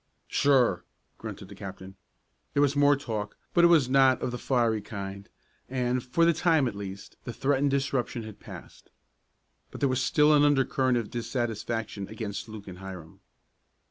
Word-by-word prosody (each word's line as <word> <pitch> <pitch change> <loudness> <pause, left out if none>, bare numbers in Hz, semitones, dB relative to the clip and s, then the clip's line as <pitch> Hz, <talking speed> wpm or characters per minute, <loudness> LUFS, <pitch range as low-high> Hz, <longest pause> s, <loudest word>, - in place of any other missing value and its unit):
"Sure," 125 -10 +3 0.4
grunted 100 - -7
the 100 - -11
captain. 95 -1 -9 0.6
There 140 - +4
was 140 0 +2
more 145 0 +5
talk, 110 -6 -5 0.2
but 170 - +4
it - - +9
was 160 -7 +5
not 130 0 +4
of - - -2
the 125 - -5
fiery 115 -4 +1
kind 100 -2 -7 0.4
and, 125 -1 0
for 165 +7 +2
the 170 - +4
time, 160 -4 +2
at 120 - -3
least, 100 -1 -8
the 120 - -5
threatened 140 +3 +1
disruption 135 -4 -1
had 110 -2 -10
passed. - - -12 0.8
But - - -10
there 140 - +2
was 130 0 0
still 150 +2 +4
an 145 - +5
undercurrent 135 -3 +2
of 115 -3 -4
dissatisfaction 115 -4 -3
against 105 0 -6
Luke 110 -2 -9
and 90 -1 -9
Hiram. 90 -4 -9
120 Hz, 170 wpm, -28 LUFS, 105-140 Hz, 0.8 s, it